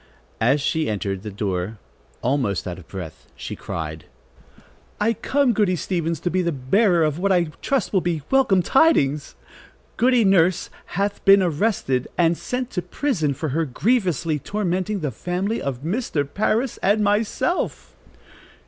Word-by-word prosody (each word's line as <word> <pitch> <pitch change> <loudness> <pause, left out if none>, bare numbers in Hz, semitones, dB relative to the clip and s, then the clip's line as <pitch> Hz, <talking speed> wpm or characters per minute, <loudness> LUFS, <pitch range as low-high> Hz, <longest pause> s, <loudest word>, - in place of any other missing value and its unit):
As 125 +6 +3
she 155 0 0
entered 100 -2 -2
the 105 - -6
door, 100 0 -3 0.5
almost 125 -9 0
out 90 0 -5
of 85 - -15
breath, 90 -5 -8
she - - -6
cried: 80 -1 -6 0.9
"I 220 +2 +2
come, 270 +3 +1
Goody 200 -4 +2
Stevens, 165 -1 -2
to 175 - -1
be 185 - +1
the 170 -1 0
bearer 170 - +2
of 155 +1 0
what 200 +2 +1
I 175 -3 +2
trust 270 -7 0
will 190 - +3
be 165 -4 -2
welcome 230 -9 +4
tidings. 150 - +2 0.6
Goody 245 -1 +4
Nurse 185 -2 +3 0.3
hath 200 +1 -1
been 195 0 +7
arrested 155 - 0
and 170 -1 +3
sent 250 +7 -4
to 180 - -2
prison 170 - -1
for 155 +3 -3
her 160 +5 0
grievously 170 - 0
tormenting 195 +3 -2
the 150 -3 -2
family 180 - -2
of 135 -1 -4
Mr. 165 - -1
Parris 215 - 0
and 210 +2 +3
myself." 210 - -1
175 Hz, 150 wpm, -22 LUFS, 140-210 Hz, 0.9 s, been